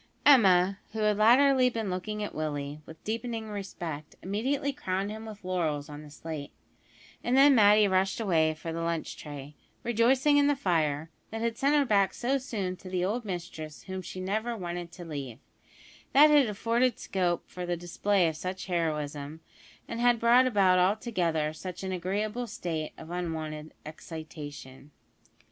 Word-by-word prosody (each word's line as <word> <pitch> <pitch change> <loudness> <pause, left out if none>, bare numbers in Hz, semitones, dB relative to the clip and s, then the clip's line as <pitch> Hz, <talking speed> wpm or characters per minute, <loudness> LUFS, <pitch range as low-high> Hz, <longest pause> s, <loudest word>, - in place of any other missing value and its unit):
Emma, 195 -8 +6
who 220 - -4
had 210 -1 +3
latterly 255 +4 +5
been 225 -5 -3
looking 210 +4 -3
at 205 - -5
Willie 150 -1 -4
with 160 - -13
deepening 225 0 -3
respect, 175 -7 -6
immediately 265 +9 -1
crowned 195 -3 -2
him 220 +1 -7
with 210 -2 -10
laurels 160 -6 -1
on 145 0 -8
the 150 - -12
slate, 150 -1 -7 0.7
and 245 +2 +2
then 280 +1 +8
Matty 210 -2 +6
rushed 190 +1 +1
away 160 -7 +2
for 165 +1 -6
the 165 - -3
lunch 165 -1 -2
tray 145 -1 -9 0.3
rejoicing 255 +5 +3
in 285 - +4
the 290 - +3
fire, 160 - 0 0.2
that 225 0 -5
had 230 -1 0
sent 280 +2 +2
her 290 -1 +4
back 200 -5 +2
so 265 +3 0
soon 205 -8 -3
to 185 - -10
the 180 -1 0
old 225 +4 -2
mistress 170 -5 -6
whom 190 -1 -5
she 185 +1 -8
never 220 +5 -2
wanted 175 -2 -5
to 175 0 -9
leave; 140 -7 -6 0.8
that 300 +2 +8
had 290 -4 +6
afforded 230 +3 +1
scope 180 -3 -1
for 180 -1 -6
the 175 0 -1
display 175 +2 +1
of 160 - -2
such 185 +4 -5
heroism, 155 -3 -2 0.5
and 230 - -5
had 240 -1 +4
brought 240 +3 +5
about 195 -6 +4
altogether 180 -6 +1
such 180 +4 -7
an 190 - -3
agreeable 205 +6 -2
state 160 -6 -4
of 160 +1 -10
unwonted 160 -3 -4
excitation. 150 -3 -9
185 Hz, 165 wpm, -29 LUFS, 160-225 Hz, 0.8 s, then